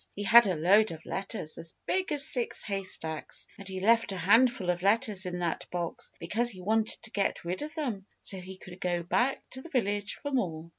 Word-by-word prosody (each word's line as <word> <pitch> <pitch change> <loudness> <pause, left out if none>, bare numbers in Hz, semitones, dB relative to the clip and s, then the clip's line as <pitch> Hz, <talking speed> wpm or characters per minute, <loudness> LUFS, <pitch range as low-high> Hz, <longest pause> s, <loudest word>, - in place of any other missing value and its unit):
He 205 - -4
had 230 +2 +8
a 185 - +1
load 200 +7 +4
of 160 0 -9
letters 195 -5 -4
as 165 - -3
big 370 -2 0
as 290 -2 +4
six 245 -2 +2
haystacks. 185 -6 -3
And 200 - -9
he 190 -1 -4
left 230 +2 +3
a 190 - -4
handful 205 +1 +4
of 175 0 -4
letters 205 -1 +1
in 180 0 -3
that 175 -2 -2
box, 175 -2 -4
because 220 +8 0
he 195 -6 -4
wanted 220 +4 0
to 225 - -12
get 200 -5 -1
rid 180 +7 -3
of 305 +2 -6
them 230 - -3
so 195 - -4
he 185 +1 -9
could 185 0 -12
go 175 -2 0
back 245 +10 0
to 260 - -4
the 335 - -11
village 205 -7 -1
for 285 - -6
more. 170 - -2
200 Hz, 215 wpm, -29 LUFS, 180-235 Hz, -, had